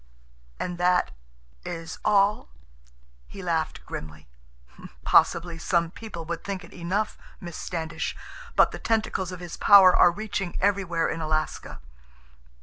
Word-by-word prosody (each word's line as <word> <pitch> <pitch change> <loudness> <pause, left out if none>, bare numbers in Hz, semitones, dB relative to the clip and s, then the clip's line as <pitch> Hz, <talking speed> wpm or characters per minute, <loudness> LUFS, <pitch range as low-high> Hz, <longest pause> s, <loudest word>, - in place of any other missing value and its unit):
"And 175 -1 -4
that—is 165 - -3
all?" 205 - +2 0.8
He 195 - -10
laughed 165 -3 -2
grimly. 75 -1 -8 0.8
"Possibly 170 -1 +3
some 170 0 +1
people 185 -6 -8
would 170 0 -5
think 195 -2 -5
it - - -14
enough, 190 +5 -2 0.2
Miss 175 -3 -8
Standish. 165 -1 -4 0.4
But - - +5
the - - -7
tentacles 215 -5 -1
of 180 -1 -8
his 175 -2 -7
power 195 -3 +8
are - - +7
reaching 195 -2 -4
everywhere 190 -4 +1
in 165 - -3
Alaska. 155 - -3
175 Hz, 125 wpm, -26 LUFS, 165-195 Hz, 0.8 s, power